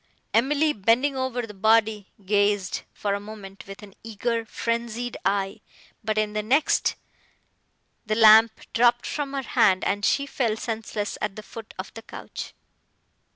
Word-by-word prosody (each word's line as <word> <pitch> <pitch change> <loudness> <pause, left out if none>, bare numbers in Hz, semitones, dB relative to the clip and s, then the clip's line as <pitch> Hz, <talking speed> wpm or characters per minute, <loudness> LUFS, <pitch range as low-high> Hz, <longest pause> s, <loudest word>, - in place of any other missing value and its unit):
Emily, 290 +6 +3
bending 235 +7 +2
over 260 -2 -2
the 210 - -11
body, 220 0 +2 0.2
gazed, 205 -1 +1
for 200 -1 -2
a 200 - -1
moment, 200 -2 -10
with 195 +2 -10
an 200 -2 -12
eager, 230 +1 -2
frenzied 235 +1 -3
eye; 195 +1 -1 0.4
but, 215 0 -1
in 215 -1 0
the 210 - -1
next, 265 +8 +2 1.1
the 215 - +1
lamp 220 0 +7
dropped 240 +1 +3
from 285 -2 -3
her 275 -1 -2
hand, 190 -5 +3
and 205 +1 -1
she 280 +7 +2
fell 235 -6 -1
senseless 220 -2 -4
at 210 -2 -2
the 215 - -8
foot 225 0 -11
of 185 - -7
the 225 - -9
couch. - - -9
220 Hz, 155 wpm, -25 LUFS, 205-235 Hz, 1.1 s, lamp